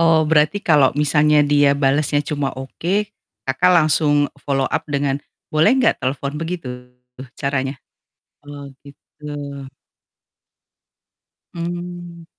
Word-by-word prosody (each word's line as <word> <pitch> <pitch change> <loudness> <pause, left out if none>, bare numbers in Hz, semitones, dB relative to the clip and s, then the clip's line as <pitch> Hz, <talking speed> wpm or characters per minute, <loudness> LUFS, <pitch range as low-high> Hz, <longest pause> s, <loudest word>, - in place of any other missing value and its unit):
Oh, 165 -1 +4
berarti 150 +4 +2
kalau 145 -5 +5
misalnya 150 0 +3
dia 145 -1 +3
balasnya 145 +1 +1
cuma 145 -1 -2
oke, 185 +10 -3 0.3
Kakak 135 +8 +2
langsung 155 -2 +3 0.3
follow 135 -1 -1
up - - 0
dengan, 140 -1 -1 0.3
"Boleh 155 +6 +4
nggak 255 -4 +2
telepon?" 140 +1 -2
Begitu 165 0 -4 0.7
caranya? 135 0 -2 0.7
Oh 145 0 -9 0.2
gitu. 140 +1 -19 2.3
Mmm. 175 0 -6
150 Hz, 100 wpm, -20 LUFS, 140-170 Hz, 2.3 s, kalau